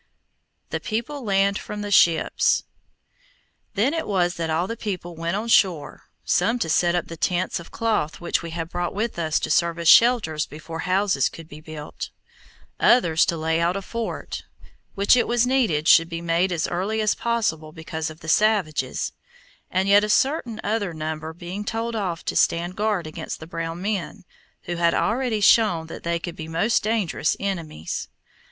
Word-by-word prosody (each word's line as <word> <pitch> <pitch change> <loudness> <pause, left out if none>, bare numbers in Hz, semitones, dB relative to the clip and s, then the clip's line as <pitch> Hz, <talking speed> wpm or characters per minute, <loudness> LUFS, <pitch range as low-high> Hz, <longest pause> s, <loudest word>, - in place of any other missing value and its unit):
THE - - -1
PEOPLE 250 +6 -4
LAND 200 -1 +2
FROM 210 0 -6
THE 205 - -5
SHIPS 170 -4 +3 1.1
Then 230 +9 +2
it 325 - -2
was 180 -3 +1
that 165 -2 -3
all 160 +3 +1
the 230 - -4
people 180 -6 -5
went 165 +2 -2
on 215 +3 -3
shore, 185 -9 +2 0.2
some 225 +7 +2
to 165 -9 -2
set 175 +2 +3
up 175 - 0
the 165 - -8
tents 180 +3 -1
of 170 - -11
cloth 215 -9 -1
which 175 - -1
we 170 - -6
had 165 0 -4
brought 175 +1 -3
with 215 -2 -2
us 160 -1 +1
to - - -2
serve 170 -1 +2
as 170 -1 -2
shelters 210 -8 +5
before 160 +2 -8
houses 195 +2 +2
could 165 -1 -11
be 155 0 -11
built; 155 -1 -7 0.7
others 170 -10 +4
to 170 - 0
lay 160 +1 0
out 175 +2 +1
a 195 - -2
fort, 230 +3 -5 0.5
which 200 +4 +5
it 245 - +2
was 240 0 +2
needed 225 - +1
should 165 0 +6
be 165 -1 -4
made 170 +2 +1
as 170 -2 0
early 195 +5 -1
as 215 -1 +2
possible 210 -10 -1
because 160 0 -5
of 155 +1 -12
the 165 - -10
savages, 200 -4 +1 0.6
and 190 +1 0
yet 200 +1 +6
a 210 - -1
certain 245 -1 +1
other 205 -5 -1
number 155 0 -4
being 175 +4 -6
told 225 +2 -3
off 185 -6 -3
to - - -2
stand 175 +2 +1
guard 210 -4 0
against 155 +1 -6
the 160 - -8
brown 165 0 -5
men, 200 0 -3 0.4
who 175 -1 -4
had 170 0 +2
already 230 -2 0
shown 200 -6 +4
that 160 - -9
they 170 0 -1
could 170 0 -6
be 160 - -7
most 175 +9 +1
dangerous 210 -8 0
enemies. 165 - -4
175 Hz, 185 wpm, -23 LUFS, 165-215 Hz, 1.1 s, should